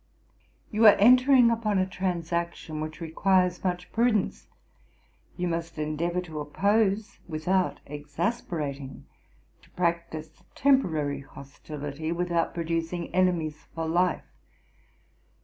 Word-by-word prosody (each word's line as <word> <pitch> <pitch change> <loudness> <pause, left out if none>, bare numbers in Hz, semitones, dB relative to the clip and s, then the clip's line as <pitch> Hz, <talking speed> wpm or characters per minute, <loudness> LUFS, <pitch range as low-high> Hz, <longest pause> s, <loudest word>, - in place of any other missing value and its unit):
'You 215 +1 +5
are 205 - +9
entering 250 +2 +6
upon 220 -3 0
a 185 - +3
transaction 170 -3 -3
which 155 0 -6
requires 180 +2 +1
much 180 -1 -2
prudence. 230 -3 +1 0.9
You 180 0 -1
must 165 -1 -3
endeavour 160 +4 -1
to 160 -4 -7
oppose 200 +7 +1
without 180 +4 0
exasperating; 145 - -4 0.6
to - - -22
practise 170 -3 -3
temporary 160 - +2
hostility, 145 +3 -7
without 170 -1 0
producing 165 +1 -3
enemies 175 -4 0
for 165 -1 -2
life. 175 +2 +1
170 Hz, 100 wpm, -27 LUFS, 155-190 Hz, 0.9 s, are